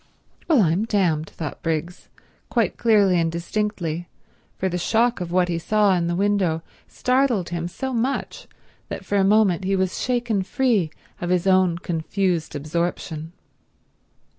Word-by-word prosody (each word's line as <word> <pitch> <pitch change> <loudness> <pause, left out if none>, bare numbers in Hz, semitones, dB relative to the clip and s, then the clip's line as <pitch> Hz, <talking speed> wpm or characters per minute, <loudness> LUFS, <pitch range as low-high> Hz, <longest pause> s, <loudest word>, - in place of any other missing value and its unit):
"Well 290 -10 +5
I'm 175 +6 +1
damned," 175 -8 +1
thought 155 -4 -6
Briggs, 165 +2 -3 0.4
quite - - +1
clearly 205 -6 +4
and 165 -1 +1
distinctly, 175 -2 -3 0.5
for 190 - 0
the 180 -1 -2
shock 230 +4 +1
of 175 -1 -4
what 180 0 +3
he 170 -1 -1
saw 210 +2 +3
in 175 -2 +1
the 175 - -1
window 190 -4 +1 0.2
startled 250 -7 +1
him 170 0 -3
so 265 +9 -4
much 250 +4 -2 0.4
that - - -6
for 205 - 0
a - - +4
moment 195 -3 +3
he 195 +1 +1
was 190 -1 -1
shaken 240 -5 0
free 210 -4 +1 0.3
of 175 - -2
his 180 0 +1
own 185 -3 +3
confused 175 -1 -1
absorption. 160 +1 -3
185 Hz, 150 wpm, -23 LUFS, 170-210 Hz, 0.5 s, Well